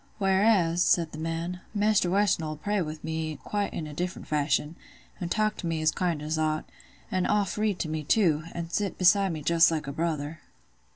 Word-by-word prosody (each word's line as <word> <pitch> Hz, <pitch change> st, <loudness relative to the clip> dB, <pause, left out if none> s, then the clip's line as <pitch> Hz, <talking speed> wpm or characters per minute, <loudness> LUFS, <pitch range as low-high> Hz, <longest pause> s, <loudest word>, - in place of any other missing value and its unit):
"Whereas," 190 Hz, -3 st, +3 dB
said 170 Hz, -2 st, +3 dB
the 155 Hz, -, -8 dB
man, 165 Hz, +2 st, -3 dB, 0.2 s
"Maister 205 Hz, -3 st, +3 dB
Weston 195 Hz, -3 st, +2 dB
'ull 155 Hz, 0 st, -3 dB
pray 205 Hz, +6 st, -1 dB
with 155 Hz, -2 st, -5 dB
me 160 Hz, -1 st, -3 dB
quite 205 Hz, -1 st, -2 dB
in 160 Hz, -, -4 dB
a 150 Hz, -, -8 dB
different 180 Hz, +4 st, -4 dB
fashion, 150 Hz, +1 st, 0 dB, 0.4 s
an' 175 Hz, -, -3 dB
talk 215 Hz, +2 st, +1 dB
to 175 Hz, -, -4 dB
me 165 Hz, -1 st, -1 dB
as 155 Hz, -, +4 dB
kind 170 Hz, -4 st, -1 dB
as 155 Hz, +1 st, -2 dB
owt; 155 Hz, 0 st, 0 dB, 0.5 s
an' 185 Hz, -1 st, +1 dB
oft 205 Hz, -3 st, +1 dB
read 210 Hz, -3 st, 0 dB
to -, -, -2 dB
me 155 Hz, 0 st, -3 dB
too, 155 Hz, -2 st, +3 dB
an' 170 Hz, -1 st, -5 dB
sit 200 Hz, +1 st, -1 dB
beside 190 Hz, +1 st, +4 dB
me 155 Hz, -2 st, -5 dB
just 165 Hz, +2 st, +5 dB
like 155 Hz, -2 st, -2 dB
a 140 Hz, -, -4 dB
brother." 155 Hz, 0 st, -3 dB
170 Hz, 205 wpm, -27 LUFS, 155-195 Hz, 0.5 s, just